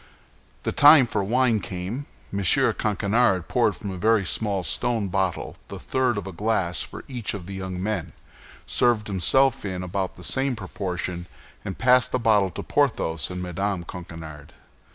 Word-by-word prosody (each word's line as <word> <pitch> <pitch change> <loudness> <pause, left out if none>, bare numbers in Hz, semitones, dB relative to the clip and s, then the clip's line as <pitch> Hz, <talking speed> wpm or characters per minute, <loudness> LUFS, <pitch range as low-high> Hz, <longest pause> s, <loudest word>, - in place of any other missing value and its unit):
The - - -1
time 145 -2 +8
for 115 - -1
wine 120 +1 +2
came. 95 +9 -5 0.3
M. 100 - -1
Coquenard 100 +1 +2
poured - - +2
from 100 - -6
a 95 - -6
very 110 0 +3
small 100 -3 -1
stone 115 0 0
bottle 95 -1 -2
the - - -7
third 130 -4 0
of 100 - -4
a 95 - -6
glass 90 -3 -1
for - - -7
each 120 -6 -3
of 95 -4 -7
the 100 - -7
young 95 -1 -5
men, 105 -5 -3 0.5
served 120 -3 +2
himself 115 +7 +2
in 95 -2 -4
about 95 +1 -3
the 90 - -11
same 135 +3 +1
proportion, 90 -3 -4 0.4
and 95 - -5
passed 125 0 +4
the - - +1
bottle 110 -5 +3
to - - -7
Porthos 110 - 0
and 90 0 -5
Mme. 90 +1 -2
Coquenard. 80 -4 -9
100 Hz, 165 wpm, -24 LUFS, 90-115 Hz, 0.5 s, time